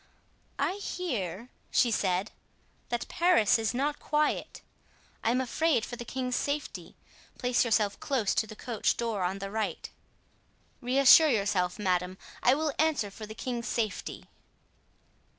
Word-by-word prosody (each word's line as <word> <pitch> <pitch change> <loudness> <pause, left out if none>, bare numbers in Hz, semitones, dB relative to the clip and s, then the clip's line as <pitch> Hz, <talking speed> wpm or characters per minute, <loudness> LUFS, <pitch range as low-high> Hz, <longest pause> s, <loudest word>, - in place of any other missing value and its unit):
"I 380 - 0
hear," 240 - -4 0.2
she 240 - +3
said, 190 -1 0 0.6
"that 240 0 -2
Paris 340 - +3
is 220 -1 0
not 285 +4 -1
quiet. 300 0 -1 0.6
I - - +2
am 250 +2 +2
afraid 260 0 +1
for 245 - -6
the 240 - -7
king's 250 0 -3
safety; 285 +1 -3 0.4
place 250 0 +2
yourself 215 -4 +1
close 255 -8 0
to 220 - 0
the 215 - -10
coach 230 -1 -1
door 230 -4 -2
on 180 +2 -1
the 195 0 -6
right." 220 0 -3 0.9
"Reassure 275 +5 +7
yourself, 200 -6 +1
madame, 185 -2 0 0.2
I 255 - +5
will 305 -1 -1
answer 295 -10 +1
for 215 +2 -9
the 215 - -9
king's 240 -1 -4
safety." 220 -2 -3
235 Hz, 140 wpm, -29 LUFS, 205-270 Hz, 0.9 s, Reassure